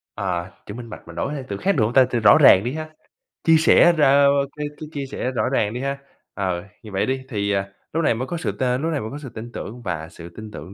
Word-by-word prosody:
Ờ, 90 -2 -2 0.2
chữ 105 - -7
minh 120 +1 -8
bạch - - -11
mình 85 - -11
đổi 140 - -2
sang 140 -3 -5
từ 100 - -3
khác 195 - +1
được 125 - +2
hông 110 +3 0
ta? 130 0 +6
Từ 120 -1 -1
rõ 115 - +7
ràng 115 -10 +7
đi 125 +3 -2
ha, 155 0 -5 0.5
chia 165 - +5
sẻ 165 +2 +6
ra 150 - +5
ơ, 140 +1 +6 0.3
cái, 150 0 -2
cái, 155 -1 -8
chia 140 -2 -3
sẻ 130 -1 -3
rõ 115 -4 0
ràng 105 0 0
đi 125 - -4
ha, 140 0 -2 0.4
ờ, 90 -3 -2 0.2
như 110 - -10
vậy 95 0 0
đi, 130 0 -1
thì, 100 -4 -1
à, 100 -1 0 0.3
lúc 165 +1 0
này 145 - +3
mới 125 +3 -4
có 175 - -3
sự 160 - -2
t - - -12
lúc 130 +6 0
này 150 - -1
mới 110 - -5
có 140 - -6
sự 145 -3 -8
tin 115 +1 -9
tưởng, 120 +2 -7
và 85 -6 -4
sự 85 0 -11
tin 110 +5 -10
tưởng 90 0 -9
120 Hz, 290 wpm, -22 LUFS, 100-140 Hz, 0.5 s, rõ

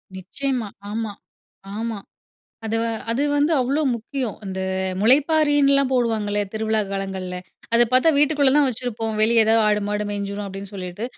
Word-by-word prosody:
நிச்சயமா. 240 +5 -3 0.2
ஆமா, 220 0 -3 0.7
ஆமா. 225 -1 -3 0.7
அது 220 +1 -1
வ - - 0 0.3
அது 240 +5 0
வந்து 290 +3 +2
அவ்வளோ 275 +5 0
முக்கியம். 240 0 -4
அந்த 190 -1 -5 0.4
முளைப்பாரின்லாம் 280 +2 +3
போடுவாங்கள 220 -4 0 0.2
திருவிழா 220 0 0
காலங்கள்ல 190 -2 -4 0.4
அத 235 - +6
பார்த்தா 255 +6 +5
வீட்டுக்குள்ள 290 -1 +4
தான் 295 - +4
வெச்சிருப்போம். 225 -2 -3
வெளிய 225 +1 +5
எதாவது 225 +1 +4
ஆடு 210 0 +2
மாடு 210 0 -1
மேஞ்சிரும். 200 0 -4
அப்படீன்னு, 195 0 -8
சொல்லிட்டு. 185 +2 -6
225 Hz, 140 wpm, -22 LUFS, 205-270 Hz, 0.7 s, அத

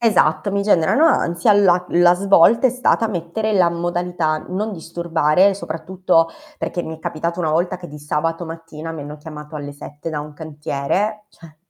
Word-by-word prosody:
Esatto, 195 -6 +2
mi 200 0 +1
generano 205 - +3
ansia, 170 - +3
la 180 -3 +4
la 175 0 +5
svolta 200 +6 +5
è - - -1
stata 250 -2 +1
mettere 200 +3 -2
la 185 -4 +4
modalità 175 -2 -1
non 210 +4 -2
disturbare, 170 +1 +1
soprattutto 165 -1 0 0.3
perché 175 - -3
mi 160 - -6
è - - -21
capitato 170 +3 -3
una 160 -3 0
volta 170 +3 0
che 175 -1 -10
di 150 - -10
sabato 165 +3 -2
mattina 165 -1 -8
mi 160 - -6
hanno 145 +1 -7
chiamato 150 0 -9
alle 145 -1 -6
7 145 +2 -8
da 155 -2 -3
un 150 0 -9
cantiere, 160 +7 -3
cioè, 165 -5 -17
170 Hz, 175 wpm, -20 LUFS, 155-190 Hz, 0.3 s, la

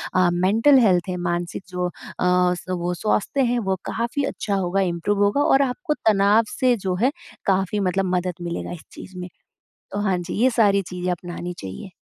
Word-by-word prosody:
अ, 185 -1 +4
mental 220 +10 +4
health 185 -7 +4
है 180 - -2
मानसिक 175 +1 -3
जो 180 0 -2
अ, - - -6 0.3
स 180 0 +2 0.2
वो 175 +1 -1
स्वास्थ्य 215 +8 0
हैं 245 - +1
वो 190 -3 0
काफ़ी 235 +5 -2
अच्छा 200 - -2
होगा 190 0 0
इंप्रूव 190 +3 0
होगा 205 +8 +2
और 275 -1 +4
आपको 300 +5 -1
तनाव 210 -3 +3
से 255 -1 +2
जो 190 -3 -2
है 260 +4 +3 0.3
काफ़ी 195 +1 +1
मतलब 195 0 0
मदद 180 0 -1
मिलेगा 170 0 -4
इस 175 - -8
चीज़ 185 - -11
में। 180 - -6 0.6
तो 200 - -3
हाँ, 195 -3 +1
जी 175 0 -5
ये 250 +4 +4
सारी 205 -4 +3
चीज़ें 180 0 -4
अपनानी 175 0 -5
चाहिए। 95 - -8
190 Hz, 190 wpm, -23 LUFS, 180-215 Hz, 0.6 s, अ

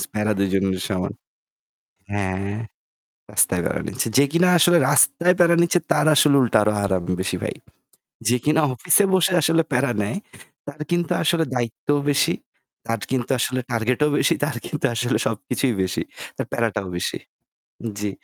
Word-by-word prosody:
স - - -1
প্যারা 105 0 0
২ 100 0 +1
জনেরই 95 -1 0
সমান। 95 -2 -2 1.0
হ্যাঁ, 100 0 -2 0.8
রাস্তায় - - +2
প্যারা - - -2
নিচ্ছে। - - -2
যে 140 - +6
কিনা 175 +2 +3
আসলে 175 +1 +5
রাস্তায় 180 +1 +4
প্যারা 170 -1 +5
নিচ্ছে 170 +1 +3
তার - - +1
আসলে 145 -1 +5
উল্টা 120 -3 +3
আরো 105 0 +2
আরাম 95 -3 0 0.2
বেশি 95 - -2
ভাই। - - -3 0.7
যে 125 +2 +3
কিনা 155 +2 +2
office-এ 165 - +3
বসে 185 0 +3
আসলে 165 +2 +3
প্যারা 130 0 +1
নেয় 105 - -2 0.5
তার 145 +1 -9
কিন্তু 175 -1 0
আসলে 165 0 +2
দায়িত্বও 125 +4 -1
বেশি, 140 - +2 0.5
তার 115 -1 -1
কিন্তু 125 -2 -1
আসলে 130 +1 -1
target-ও 120 +5 +1
বেশি, - - +3
তার 145 -4 -2
কিন্তু 150 - -3
আসলে 120 0 0
সবকিছুই 115 +3 -1
বেশি, 95 - -2 0.3
তার - - -4
প্যারাটাও 110 -4 -1
বেশি। - - -3 0.8
জি, 105 0 -2
125 Hz, 160 wpm, -22 LUFS, 105-155 Hz, 1.0 s, যে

